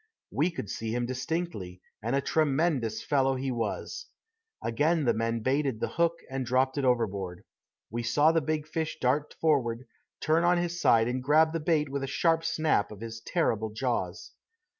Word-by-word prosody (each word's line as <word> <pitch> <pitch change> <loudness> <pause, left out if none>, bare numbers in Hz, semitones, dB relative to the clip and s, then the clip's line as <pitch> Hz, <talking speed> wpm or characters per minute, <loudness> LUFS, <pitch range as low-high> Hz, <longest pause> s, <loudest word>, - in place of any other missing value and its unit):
We 155 +6 +2
could 165 - -6
see 110 +4 -3
him 120 0 0
distinctly, 125 - -3 0.2
and 115 +5 -1
a 140 - +2
tremendous 140 -6 +1
fellow 135 -2 +2
he 130 +1 -2
was. 120 - -3 0.6
Again 150 +6 +1
the - - +4
men 115 +1 -1
baited 135 -1 0
the - - -1
hook 170 0 0
and 135 0 -3
dropped 130 +3 +1
it - - -1
overboard. 100 -8 0 0.5
We 120 +2 -2
saw 145 +7 +4
the 165 0 +2
big 155 +1 -2
fish 160 0 -3
dart 135 +4 0
forward, 130 -6 +1 0.3
turn 160 +2 +2
on 175 +1 +4
his 175 0 -2
side 115 -1 +5
and 125 +1 -1
grab 155 +4 +4
the 165 - 0
bait 155 -2 +1
with 140 0 -3
a - - -2
sharp 165 +4 +2
snap 155 -11 +1
of 105 - -9
his 115 0 -6
terrible 115 - 0
jaws. 120 +3 -3
135 Hz, 180 wpm, -29 LUFS, 115-160 Hz, 0.6 s, side